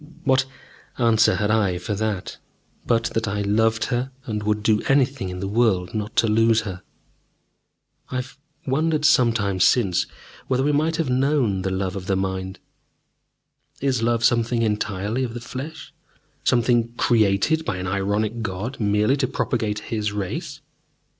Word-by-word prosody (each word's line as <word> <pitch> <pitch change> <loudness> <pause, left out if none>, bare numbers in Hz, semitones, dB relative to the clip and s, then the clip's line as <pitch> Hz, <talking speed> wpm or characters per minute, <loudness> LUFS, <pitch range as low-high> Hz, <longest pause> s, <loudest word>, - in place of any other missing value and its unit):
What 130 -3 +3 0.5
answer 115 -3 +4
had 105 0 0
I 100 -5 +2
for 95 +4 -4
that, 105 -2 -3 0.5
but 115 -1 +2
that 115 -1 -1
I 100 +1 -1
loved 110 +2 +2
her 125 +2 -1 0.2
and 110 -4 -3
would 105 0 -1
do 105 -1 +3
anything 135 -7 +2
in 90 0 -6
the 100 - -2
world 100 -4 +1
not 105 0 -4
to 115 - +3
lose 115 +1 +3
her? 95 -4 -6 1.3
I - - -5
have 130 +1 -4 0.3
wondered 155 +3 +1
sometimes 115 - +3
since 100 -8 +3 0.4
whether 130 0 +1
we 145 - +2
might 155 +3 +1
have 160 -6 -1
known 130 -7 +1
the 95 - -1
love 95 0 -2
of 95 -1 -6
the 95 - +1
mind. 95 0 -3 1.2
Is 130 -4 0
love 115 0 +1
something 115 0 +2
entirely 105 +2 -1
of 120 -2 -4
the - - -4
flesh, 130 +5 -8 0.5
something 120 -1 +2
created 115 +8 +2
by 90 - -2
an 90 - -4
ironic 100 +4 -1
God 110 +5 -4
merely 105 +5 +2
to 135 -2 0
propagate 115 -5 -1
His 105 -2 -1
race? 100 -3 -5
110 Hz, 155 wpm, -23 LUFS, 100-125 Hz, 1.3 s, answer